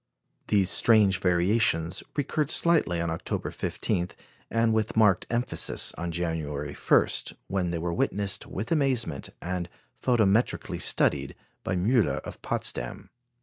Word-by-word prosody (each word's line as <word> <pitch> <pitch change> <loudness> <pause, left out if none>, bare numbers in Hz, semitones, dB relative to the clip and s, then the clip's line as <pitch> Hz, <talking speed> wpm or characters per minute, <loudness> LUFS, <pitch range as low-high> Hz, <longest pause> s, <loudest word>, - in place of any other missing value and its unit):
These 100 -3 +3
strange 105 -5 +4
variations 90 -1 +1
recurred 150 0 -1
slightly 160 - +3
on 85 -1 -1
October 80 - -3
15, 90 0 -2 0.4
and 115 0 +2
with 110 0 -1
marked 105 -4 +4
emphasis 120 +2 +1
on 85 0 -4
January 75 -4 -3
1, - - +3 0.4
when 95 -2 -1
they 85 - -2
were 85 +1 -2
witnessed 100 +3 -1
with 105 +5 -5
amazement, 135 -7 0
and 90 -1 -3 0.3
photometrically 115 -2 +1
studied 70 -2 +1 0.3
by 95 - -1
Müller 105 +4 +2
of - - -10
Potsdam. - - -3
95 Hz, 125 wpm, -27 LUFS, 85-115 Hz, 0.4 s, strange